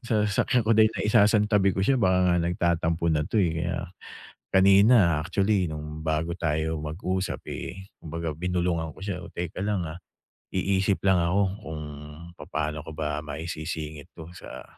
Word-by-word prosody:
sa 115 - 0
sasakyan 115 +4 +2
ko - - +2
dahil 110 0 +6
naisasantabi 105 -1 +3
ko 95 - -2
siya 135 +8 +3
baka 95 -6 +3
nga 90 - +3
nagtatampo 85 -1 0
na 75 -2 +2
'to, 110 - -1
eh. 85 -2 0
Kaya 85 +1 -2 0.8
kanina 95 -3 +6
actually, 95 +2 +1
nung 75 0 -6
bago 80 +1 -1
tayo 80 0 -1
mag-usap, 90 +5 -3
eh, 95 +3 -6 0.2
kumbaga 80 -1 -4
binulungan 85 -1 -1
ko - - -15
siya, 95 -3 -3
"Oh, - - -10
teka 90 +2 -5
lang, 100 -4 -1
ah. 80 +3 -7 0.5
Iisip 95 +1 +1
lang 95 -3 +4
ako 90 +4 +2 0.2
kung 80 -1 -6 0.5
papano 75 0 -4
ko 80 - -9
ba 75 0 -2
maisisingit 80 -1 -6
'to 80 - -8
sa, - - -10
85 Hz, 160 wpm, -26 LUFS, 80-95 Hz, 0.8 s, dahil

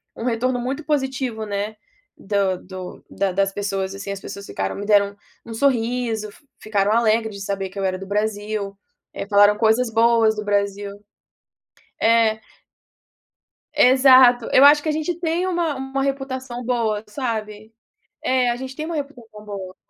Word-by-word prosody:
um - - -7
retorno 245 +1 0
muito 265 +5 -3
positivo 265 -6 -2
né, 205 +1 -3 0.4
do 195 -2 0
do 185 0 -9
da 195 -1 -1
das 195 +1 +1
pessoas, 195 -1 -3
assim, 200 0 -6
as 200 - -5
pessoas 200 0 -8
ficaram 95 0 -3
me 205 - -6
deram 200 -1 +3 0.3
um 230 - -8
sorriso, 230 -4 0
fi 285 - -22 0.2
ficaram 205 -1 +1
alegres 220 -1 +2
de 200 - -8
saber 195 -1 -3
que 200 - -14
eu - - -2
era 185 0 -1
do 195 - -7
Brasil, 210 -1 -2 0.4
eh, - - -5
falaram 205 0 +5
coisas 230 +2 +3
boas 225 -1 +4
do 210 - -4
Brasil 200 0 -1 1.1
é 225 -1 +3 1.4
Exato, 255 -3 +6
eu 270 - +7
acho 295 +1 +8
que 315 - -3
a 305 - +2
gente 315 +3 -2
tem 345 +2 -1
uma 340 -4 0
uma 265 +1 -4
reputação 260 -3 -4
boa, 225 -4 0
sabe. 220 -3 -5 0.5
É, 255 -1 +2
a 240 - 0
gente 260 +1 -7
tem 310 - -4
uma 335 - -4
reputacao 240 -7 -8
boa. 190 -3 -7
220 Hz, 165 wpm, -21 LUFS, 200-255 Hz, 1.4 s, acho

